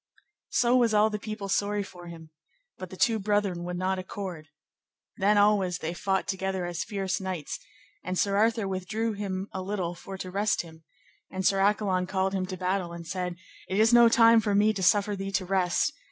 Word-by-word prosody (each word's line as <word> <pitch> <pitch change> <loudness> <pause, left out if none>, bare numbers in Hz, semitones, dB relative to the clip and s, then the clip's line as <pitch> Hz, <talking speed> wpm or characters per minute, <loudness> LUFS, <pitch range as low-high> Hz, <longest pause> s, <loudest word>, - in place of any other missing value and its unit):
So 245 -1 +3
was 235 -4 +3
all 215 +1 +4
the 210 - -3
people 215 -1 -6
sorry 205 +1 0
for 175 -2 -12
him, 165 -2 -11 0.5
but - - -7
the - - -10
two 225 -4 +2
brethren 200 -3 0
would 180 0 -4
not 185 +1 -1
accord. 185 -4 -6 0.7
Then 205 +2 +3
always 205 -4 +3
they 160 +1 -4
fought 190 +3 -1
together 190 -1 -2
as 175 -1 -3
fierce 195 -2 -3
knights, 185 -5 -4 0.4
and 185 +1 -3
Sir 200 +1 +1
Arthur 220 0 +2
withdrew 215 +4 -2
him 195 -1 -4
a 190 - -4
little 185 -3 -3
for 190 +2 -9
to 185 -1 -6
rest 205 +1 0
him, 160 -1 -15 0.5
and 190 -1 -4
Sir 195 0 +3
Accolon 195 -2 +1
called 190 0 0
him 185 -1 -1
to 185 0 -5
battle 180 -1 -2
and 170 -1 -8
said, 180 0 -3 0.3
It 190 - -1
is 225 +2 +4
no 235 -1 +8
time 230 0 +6
for 205 -2 0
me 210 +2 +4
to 195 - -4
suffer 205 +2 +3
thee 195 0 -5
to 185 0 0
rest. 180 -1 +1
195 Hz, 200 wpm, -27 LUFS, 185-210 Hz, 0.7 s, no